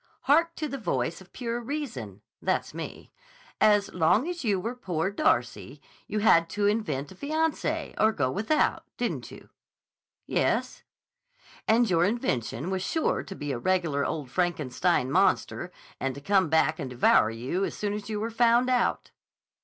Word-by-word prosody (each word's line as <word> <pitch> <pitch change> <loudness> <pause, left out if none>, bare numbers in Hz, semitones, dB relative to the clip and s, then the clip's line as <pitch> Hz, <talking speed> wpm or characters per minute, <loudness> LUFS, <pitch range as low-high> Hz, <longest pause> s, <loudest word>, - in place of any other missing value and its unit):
Hark 330 +4 +3
to 310 - -3
the 275 -1 -5
voice 145 - -2
of 190 - -16
Pure 240 -1 -3
Reason 220 - -5 0.2
(that's - - -1
me). - - -8 0.5
As 205 -2 +4
long 180 - +3
as 350 -3 -4
you 205 -5 +1
were 230 +6 -3
'Poor 185 -6 -2
Darcy,' 310 +10 0 0.3
you 215 - -3
had 170 -6 +5
to 205 +2 -1
invent 160 -10 0
a - - -12
fiancé 315 - -1
or 220 +1 +5
go 130 -10 0
without, 220 - +1 0.2
didn't - - -3
you?" - - -13 0.8
"Yes." - - 0 0.9
"And 230 +2 +4
your 170 -3 +3
invention 175 - -1
was 190 -1 -1
sure 320 - 0
to 195 - -9
be 145 -4 -4
a 125 - -3
regular 165 -3 +1
old 140 -5 -3
Frankenstein 155 -3 0
monster, - - +1 0.3
and 135 -1 -2
to - - -7
come 190 +1 +2
back 160 0 +2
and 135 -4 -4
devour 120 -3 +4
you 125 +12 -2
as - - -2
soon 205 -1 -2
as 210 0 -6
you 210 -1 -2
were 225 +2 -3
found 240 +2 +3
out." 245 -2 0
195 Hz, 165 wpm, -27 LUFS, 150-235 Hz, 0.9 s, had